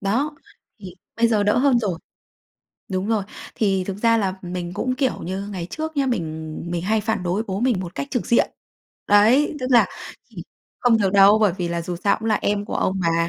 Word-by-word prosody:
Đó, 260 +10 -1 0.5
thì 185 -3 -9 0.2
bây 230 +1 +3
giờ 215 -3 +2
đỡ 205 +3 +2
hơn 260 -2 +4
rồi. 190 -7 -2 0.9
Đúng 190 +1 -2
rồi, 220 -2 +1 0.3
thì 195 -4 +1
thực 195 - -4
ra 230 +2 +3
là 190 -3 -1
mình 175 -1 -5
cũng, 255 +6 -1
kiểu 260 0 -1
như, 195 +3 -4
ngày 180 -3 -5
trước 315 0 -5
nhá 275 -1 +1
mình 160 -8 -3
mình 170 -1 -2
hay 215 +4 +1
phản 220 -2 -2
đối 180 +4 -1
bố 195 -2 -4
mình 240 -6 +1
một 180 -1 -7
cách 280 - -4
trực 245 - -2
diện. 235 - +3 0.6
Đấy, 230 +9 +4
tức 255 - -2
là 240 - +6 0.4
chỉ - - -10 0.4
không 235 -2 +4
được 195 -2 +1
đâu, 200 +2 +7
bởi 210 -4 +3
vì 175 -1 -2
là 170 0 -2
dù 175 +1 -4
sao 200 +4 +1
cũng 220 +1 -3
là 215 - +3
em 205 0 0
của - - -5
ông 190 0 0
mà, 170 -1 +1
205 Hz, 220 wpm, -22 LUFS, 185-230 Hz, 0.9 s, đâu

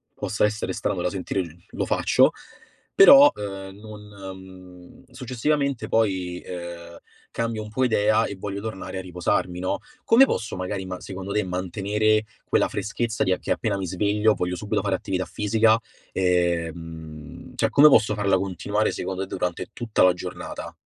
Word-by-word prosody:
possa 105 - 0
essere 105 -3 -2
strano 90 0 -2
da 90 - 0
sentire 95 0 -2
l 85 -2 -8 0.2
lo - - -2
faccio. - - +3 0.6
Però, 280 +8 +9
ehm, 95 -1 -7
non, 105 -1 -10
mhmm, 95 -2 -12
successivamente 135 +1 -1
poi, 95 -5 0
ehm, 85 -1 -8 0.3
cambio 115 -2 -2
un 105 - -9
po' 130 +5 -1
idea 110 -2 +3
e 100 - -5
voglio 100 0 -5
tornare 95 -3 -5
a - - -4
riposarmi, 90 0 -1
no, 95 - -1 0.3
come 235 +4 +7
posso 110 - -3
magari 95 +1 -4
ma 90 -1 -6
secondo 95 +1 -6
te, 105 - +1
mantenere 105 +4 0 0.2
quella - - +2
freschezza 115 -1 -2
di 95 - +3
a 90 - -3
che - - -5
appena 110 -3 0
mi 95 - -3
sveglio, 105 +4 +2
voglio 90 0 -2
subito 105 +4 -2
fare 100 -2 0
attività 95 0 -3
fisica, 110 +1 +2 0.4
ehm, 85 -3 -2
cioè - - +1
come 150 +2 +7
posso 110 -6 +4
farla 100 -2 +2
continuare 100 +3 -1
secondo 95 0 -4
t - - -19
durante 90 -1 -3
tutta 120 -3 -1
la 90 -1 +6
giornata? 90 - -7
95 Hz, 165 wpm, -24 LUFS, 90-110 Hz, 0.6 s, Però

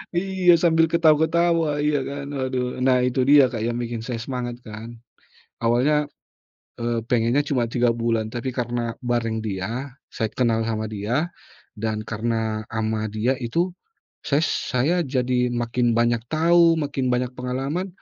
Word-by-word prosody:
iya 180 -1 +4
sambil 165 -1 +3
ketawa-ketawa 160 -1 +3
iya 150 -1 +2
kan, 140 0 -6
waduh. 130 -2 -2
Nah 125 -1 +3
itu 125 0 +1
dia 140 -3 +6
Kak 115 - -4
yang 120 0 -1
bikin 120 -1 -3
saya 115 +2 -4
semangat 120 -1 -4
kan. 110 +2 -9 0.7
Awalnya, 135 +6 +3 0.7
eee, 115 0 -1
pengennya 120 +3 +2
cuma 125 -4 +1
3 120 +1 +1
bulan 115 -2 0
tapi 120 +3 -4
karena 120 -1 -2
bareng 120 -2 -1
dia, 110 +6 -4 0.2
saya 110 - -1
kenal 115 -3 +2
sama 110 -1 -2
dia 120 - -1 0.5
dan 110 -1 -2
karena 110 0 -2
ama 110 -1 -2
dia 110 +5 0
itu, 170 +10 -1 0.5
ses 145 +3 +2
saya 150 +5 0
jadi 125 -2 0
makin 120 0 0
banyak 120 0 +2
tau, 165 +2 +4
makin 140 -4 -1
banyak 125 0 0
pengalaman. 135 +9 -3
125 Hz, 145 wpm, -23 LUFS, 115-145 Hz, 0.7 s, dia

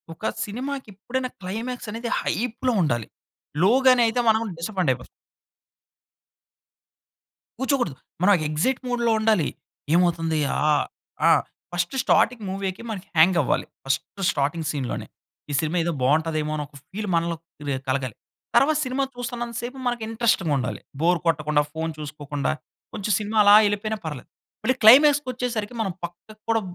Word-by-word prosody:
ఒక 215 - -21 0.2
సినిమాకెప్పుడైనా, 255 +1 -4
క్లైమాక్స్ 225 +5 -4
అనేది 230 +2 -4
హైప్‌లో 245 +2 -1
ఉండాలి. 120 -7 -1 0.6
లో 195 - +6 0.2
గానే 255 -1 +7
అయితే, 225 +2 0
మనం 220 0 +4 0.2
డిసప్పోయింట్ 180 -5 0
అయిపోతాం. - - -10 2.5
కూర్చోకూడదు. 265 - 0 0.3
మనం 205 +2 +6
ఎక్సయిట్ 165 +13 0
మూడ్‌లో 240 -2 +1
ఉండాలి. 215 -8 +2 0.5
ఏమవుతుంది? 165 -2 +2 0.3
ఆహ్, 150 -1 +3 0.4
ఆ! - - +7 0.4
ఫస్ట్ 175 +6 -1
స్టార్టింగ్ 240 -2 +3
మూవీకే 195 +1 -3
మనకి 200 -4 -5
హ్యంగ్ 175 +3 +6
అవ్వాలి. - - 0 0.2
ఫస్ట్ 135 +8 -2
స్టార్టింగ్ 155 +3 -1
సీన్‌లోనే 135 -4 -3 0.4
ఈ - - -2
సినిమా 160 +3 -1
ఏదో 170 - 0
బావుంటదేమో, 155 +3 +1
అని 150 - -2
ఒక 145 - -27 0.2
ఫీల్ 210 +1 -4
మనలో 170 0 +1 0.3
క్రియే 140 -2 -2
కలగాలి. 130 -3 -1 0.4
తర్వాత 305 +2 +5
సినిమా 255 +2 -1
చూస్తన్నంత 240 -1 -5
సేపు, 250 +3 -6
మనకు 240 -2 -1
ఇంట్రెస్టింగ్ 220 -8 +1
ఉండాలి. 125 -1 -3 0.2
బోర్ 175 +2 +3
కొట్టకుండా, 150 -2 +2
ఫోన్ 160 0 -3
చూసుకోకుండా, 145 -1 -3 0.4
కొంచెం 205 +1 -2
సినిమా 215 +1 -2
అలా 205 0 +8
ఎళిపోయినా 215 +1 -2
పర్లేదు. 150 -6 -6 0.3
మళ్ళి 255 +4 +2
క్లైమాక్స్‌ 290 +5 +8
కొచ్చేసరికి, 240 -3 -3
మనం 195 -4 0
పక్కకు 180 +5 -9
కూడా 225 -1 +3
200 Hz, 135 wpm, -24 LUFS, 155-235 Hz, 2.5 s, అలా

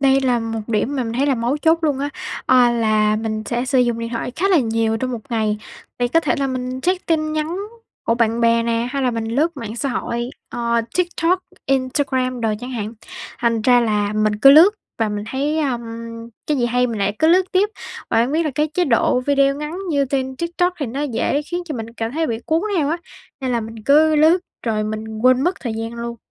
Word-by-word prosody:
đây 270 0 +4
là 250 -2 +2
một 225 -1 -3
điểm 230 +5 -1
mà 255 - 0
mình 225 - -4
thấy 270 +4 +1
là 275 - +3
mấu 240 +4 0
chốt 320 +2 +3
luôn 285 -3 +1
á, 285 +1 -1 0.4
à, 250 -2 +5
là 215 -2 +2
mình 215 0 -3
sẽ 240 +1 -1
sử 260 0 +1
dụng 240 -2 +2
điện 230 0 -3
thoại 240 +1 -3
khá 390 +3 +1
là 365 -5 +5
nhiều 225 -2 +1
trong 255 +2 -2
một 230 - -4
ngày, 215 -2 0 0.4
thì 245 0 +1
có 330 +6 +3
thể 300 - 0
là 275 - +1
mình 255 0 -3
check 365 +3 -1
tin 310 -2 +1
nhắn 310 +3 -2 0.5
của 230 - +3
bạn 230 0 +1
bè 230 0 +3
nè, 230 +1 0
hay 275 -1 -2
là 250 - +2
mình 230 -1 -3
lướt 290 +8 0
mạng 230 -2 -6
xã 275 - -2
hội, 240 0 -3 0.2
ờ, 235 -1 0 0.2
TikTok, 355 0 +1 0.3
Instagram 255 -2 0
đồ 225 - 0
chẳng 250 +1 -6
hạn, 220 -3 -4 0.5
thành 230 -2 +1
ra 245 0 +5
là 210 -2 0
mình 215 0 +1
cứ 275 +6 +7
lướt 320 +8 +8 0.3
và 225 -1 +1
mình 210 0 -4
thấy, 290 +4 -1
à, 270 -6 0 0.7
cái 300 - +1
gì 240 - +1
hay 250 +1 +2
mình 225 -3 -4
lại 200 +1 0
cứ 315 - +4
lướt 365 +3 +5
tiếp, 390 +3 +3 0.4
và 225 - +3
hông 255 +4 -1
biết 325 +2 +2
là 305 - 0
cái 305 +1 +1
chế 360 - +2
độ 250 0 +2
video 275 +1 +2
ngắn 300 +4 -5
như 280 -2 +2
trên 265 -1 -2
TikTok 345 +2 0
thì 280 - -2
nó 270 +6 -3
dễ 280 +2 0
khiến 350 +3 -4
cho 305 -4 -5
mình 225 0 -6
cảm 230 +1 -4
thấy 320 - -3
là 320 - +2
bị 225 -3 -2
cuốn 325 +3 +1
theo 290 -3 +1
á, 330 - 0 0.4
nên 260 -2 -1
là 235 - +1
mình 225 0 -8
cứ 310 +2 +5
lướt 315 +4 +5 0.3
rồi 215 -2 0
mình 215 0 -5
quên 255 0 +5
mất 360 - +2
thời 230 -3 -3
gian 225 +1 -4
luôn. 235 0 -5
250 Hz, 240 wpm, -20 LUFS, 230-295 Hz, 0.7 s, lướt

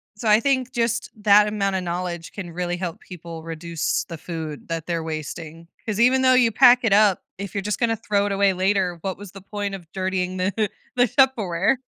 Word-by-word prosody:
So 220 +2 -5
I 210 +1 +6
think 260 -1 0
just 235 -1 -1
that 210 0 +6
amount 200 -2 -1
of 185 - -1
knowledge 175 -1 -4
can 180 -4 -7
really 175 0 -3
help 175 +2 -5
people 170 -2 -9
reduce 165 0 -2
the 165 - -8
food 160 -2 -7
that 165 -1 -3
they're 165 -2 -2
wasting. 160 +1 -6 0.2
'Cause 215 -1 -2
even 255 +2 +4
though 255 0 +5
you 245 -3 +4
pack 245 +1 +7
it 220 -4 +3
up, 205 -2 +4 0.2
if 200 0 -6
you're 200 - -2
just 210 +1 -3
gonna 230 -2 +1
throw 205 -2 0
it 205 - -2
away 195 -1 +3
later, 185 -1 0
what 190 -1 -3
was 200 -2 -10
the 195 - -11
point 200 0 -4
of 175 -3 -13
dirtying 185 -1 -2
the 200 +3 0 0.3
the 245 0 +4
Tupperware? 235 -5 +2
195 Hz, 210 wpm, -23 LUFS, 175-215 Hz, 0.3 s, pack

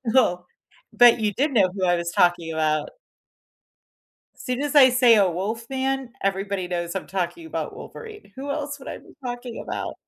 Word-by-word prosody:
Oh, 180 -8 +3 0.5
but 240 -1 +6
you 210 -2 0
did 285 +6 0
know 200 -7 +4
who 190 -1 0
I 175 0 +3
was 170 0 -3
talking 175 -2 +2
about. 155 -1 0 1.5
Soon 255 +2 -4
as 295 +1 -2
I 265 -3 +9
say 245 -2 +5
a 195 -3 +4
wolf 215 +7 -4
man, 265 -1 -2
everybody 195 -1 -1
knows 175 0 -3
I'm 195 - -4
talking 195 - -3
about - - -5
Wolverine, 425 - -11
who 280 +2 -5
else 290 0 -4
would 265 - -10
I - - -6
be - - -18
talking 245 -1 -5
about? - - -4
225 Hz, 180 wpm, -24 LUFS, 180-265 Hz, 1.5 s, I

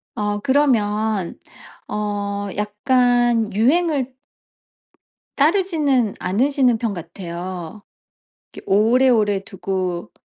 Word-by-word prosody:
어 205 0 -1
그러면 215 -7 +1 0.5
어 205 -1 -3
약간 240 +1 +2
유행을 270 - +1 1.2
따르지는 295 - +2
않으시는 250 +5 +1
편 225 -3 -2
같아요. 175 +1 -7 0.7
이렇게 - - -11
오래오래 215 -1 +3
두고 185 -2 -4
215 Hz, 180 characters per minute, -20 LUFS, 200-260 Hz, 1.2 s, 오래오래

